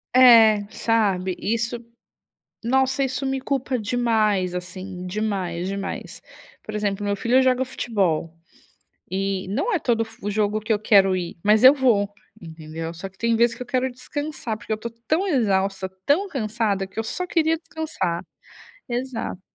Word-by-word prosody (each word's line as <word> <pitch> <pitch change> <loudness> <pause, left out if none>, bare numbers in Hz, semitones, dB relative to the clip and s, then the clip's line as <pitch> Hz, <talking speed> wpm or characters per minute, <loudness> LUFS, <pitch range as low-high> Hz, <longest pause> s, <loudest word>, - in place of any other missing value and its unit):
É, 225 -5 +7
sabe. 195 -5 +1
Isso, 230 +2 -1 0.9
nossa, 265 +3 +2
isso 265 +1 -2
me 265 0 -1
culpa 265 -1 -1
demais, 215 -5 +1
assim, 185 0 -6
demais, 185 -3 -2
demais. 195 0 -5 0.4
Por 215 - -8
exemplo, 205 -1 -1
meu 200 0 0
filho 245 +5 +3
joga 255 0 +3
futebol, 190 -10 -1 0.8
e, 195 0 -2
não 220 - -1
é 370 - +2
todo 230 -5 +1
f 225 -2 -7
jogo 210 +1 0
que 215 +1 -1
eu 210 - +2
quero 195 -3 +4
ir, 175 -2 -4
mas, 215 +3 +4
eu 260 - +11
vou, 215 -7 +2 0.3
entendeu. 160 0 -7
Só, 170 +4 -7
que 190 - -27
tem 230 0 +1
vezes, 235 +1 +3
que 250 - -6
eu - - -9
quero 255 +1 0
descansar, 255 -2 -5
porque 210 - -6
eu 215 - +1
tô 235 +2 -5 0.2
tão 350 +6 +1
exausta, 195 - +1 0.2
tão 375 +8 +2
cansada 215 - -1
que 190 +3 -12
eu - - -4
só 360 +10 -3
queria 325 -1 +2
descansar. 315 - -3 0.7
Exato. 245 -6 -4
220 Hz, 160 wpm, -23 LUFS, 195-255 Hz, 0.9 s, eu